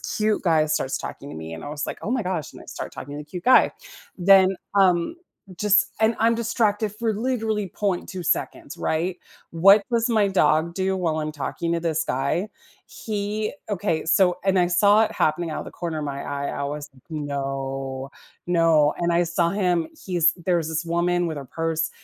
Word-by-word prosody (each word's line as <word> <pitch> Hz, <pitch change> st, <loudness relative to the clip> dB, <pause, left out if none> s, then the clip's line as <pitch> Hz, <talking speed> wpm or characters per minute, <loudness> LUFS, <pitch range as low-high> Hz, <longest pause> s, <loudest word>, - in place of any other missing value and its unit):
cute 215 Hz, 0 st, -1 dB
guy 160 Hz, -4 st, +3 dB
starts 150 Hz, -3 st, -1 dB
talking 140 Hz, -, -7 dB
to -, -, -8 dB
me, 80 Hz, +1 st, -7 dB
and 80 Hz, -, -9 dB
I -, -, -6 dB
was 150 Hz, 0 st, -4 dB
like, -, -, -5 dB
"Oh 215 Hz, -, -3 dB
my 250 Hz, -3 st, 0 dB
gosh," 180 Hz, -5 st, -3 dB
and -, -, -13 dB
I -, -, -14 dB
start -, -, -6 dB
talking 145 Hz, -, -8 dB
to 145 Hz, -, -6 dB
the 150 Hz, -, -7 dB
cute 175 Hz, +4 st, -8 dB
guy, 255 Hz, -, +6 dB, 0.5 s
then, 190 Hz, +1 st, +5 dB, 0.2 s
um, 185 Hz, -, +3 dB, 0.4 s
just 210 Hz, +2 st, +4 dB
and 220 Hz, +1 st, +3 dB
I'm 230 Hz, +1 st, +3 dB
distracted 220 Hz, -2 st, 0 dB
for 225 Hz, 0 st, -1 dB
literally 220 Hz, -3 st, -1 dB
.2 185 Hz, -1 st, -3 dB
seconds, -, -, -2 dB
right? 175 Hz, +3 st, -1 dB, 0.3 s
What 195 Hz, +5 st, +6 dB
does 235 Hz, -1 st, +2 dB
my 215 Hz, -3 st, +3 dB
dog 170 Hz, -3 st, +2 dB
do 190 Hz, 0 st, 0 dB
while 165 Hz, -4 st, -1 dB
I'm 155 Hz, 0 st, -3 dB
talking 165 Hz, +3 st, -3 dB
to 170 Hz, -, 0 dB
this 160 Hz, -1 st, 0 dB
guy? 140 Hz, +10 st, -1 dB, 0.4 s
He 210 Hz, 0 st, -3 dB, 0.2 s
Okay, 175 Hz, -5 st, -1 dB
so 180 Hz, +2 st, +3 dB
And 195 Hz, -1 st, +3 dB
I 175 Hz, -, +4 dB
saw 205 Hz, +5 st, +5 dB
it -, -, -4 dB
happening 160 Hz, +2 st, 0 dB
out -, -, -3 dB
of -, -, -7 dB
the -, -, -9 dB
corner 165 Hz, -3 st, -4 dB
of -, -, -4 dB
my 140 Hz, -1 st, -4 dB
eye. 140 Hz, 0 st, -3 dB
I 140 Hz, -, -3 dB
was, 145 Hz, +1 st, -5 dB, 0.2 s
"No. 135 Hz, -2 st, -4 dB, 0.4 s
No," 165 Hz, -4 st, +4 dB
and 170 Hz, 0 st, 0 dB
I 170 Hz, +1 st, +3 dB
saw 170 Hz, 0 st, +1 dB
him, 180 Hz, -4 st, 0 dB, 0.2 s
he's 170 Hz, -3 st, +3 dB
There's 175 Hz, -2 st, -1 dB
this 160 Hz, +1 st, -2 dB
woman 175 Hz, +1 st, +1 dB
with 160 Hz, -3 st, -4 dB
her 140 Hz, -, -8 dB
purse, 165 Hz, +1 st, -2 dB
175 Hz, 200 wpm, -24 LUFS, 155-200 Hz, 0.5 s, guy